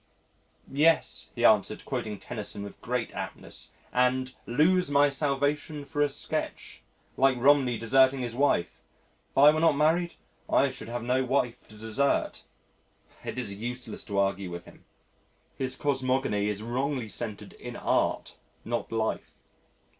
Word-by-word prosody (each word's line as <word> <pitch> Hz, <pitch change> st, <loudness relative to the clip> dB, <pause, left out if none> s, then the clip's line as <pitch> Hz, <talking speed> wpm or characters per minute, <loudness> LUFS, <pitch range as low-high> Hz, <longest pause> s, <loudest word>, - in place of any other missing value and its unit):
"Yes," 160 Hz, +4 st, +2 dB
he -, -, +1 dB
answered, -, -, +3 dB
quoting 105 Hz, -1 st, -3 dB
Tennyson 105 Hz, 0 st, -6 dB
with 100 Hz, -, -10 dB
great 125 Hz, 0 st, -2 dB
aptness, -, -, -7 dB, 0.2 s
"and 125 Hz, +1 st, +2 dB
'lose 165 Hz, +8 st, +3 dB
my 145 Hz, 0 st, +5 dB
salvation 145 Hz, +1 st, -1 dB
for 145 Hz, +1 st, -2 dB
a 145 Hz, -, +3 dB
sketch,' 135 Hz, -, -4 dB, 0.4 s
like 135 Hz, -1 st, +4 dB
Romney 130 Hz, -2 st, +4 dB
deserting 130 Hz, +3 st, +4 dB
his 120 Hz, -2 st, -3 dB
wife. 125 Hz, -9 st, +1 dB, 0.5 s
If -, -, -18 dB
I 145 Hz, +2 st, +9 dB
were 155 Hz, -, 0 dB
not 160 Hz, -2 st, +4 dB
married 165 Hz, +4 st, +2 dB, 0.3 s
I 140 Hz, -1 st, +3 dB
should 130 Hz, -4 st, -9 dB
have 120 Hz, 0 st, -4 dB
no 125 Hz, +2 st, +1 dB
wife 125 Hz, -2 st, -1 dB
to 110 Hz, -, -14 dB
desert." 110 Hz, +6 st, 0 dB, 0.8 s
It -, -, -5 dB
is 110 Hz, -6 st, -3 dB
useless 120 Hz, +2 st, -5 dB
to 100 Hz, -, -4 dB
argue 100 Hz, -1 st, +1 dB
with 85 Hz, 0 st, -7 dB
him. -, -, -17 dB, 0.7 s
His 130 Hz, -1 st, -2 dB
cosmogony 130 Hz, -7 st, 0 dB
is 105 Hz, 0 st, -3 dB
wrongly 130 Hz, +1 st, -2 dB
centred 110 Hz, -1 st, -6 dB
in -, -, -9 dB
Art -, -, 0 dB, 0.3 s
not 120 Hz, 0 st, -3 dB
life. 110 Hz, -1 st, -2 dB
130 Hz, 145 wpm, -28 LUFS, 115-140 Hz, 0.8 s, I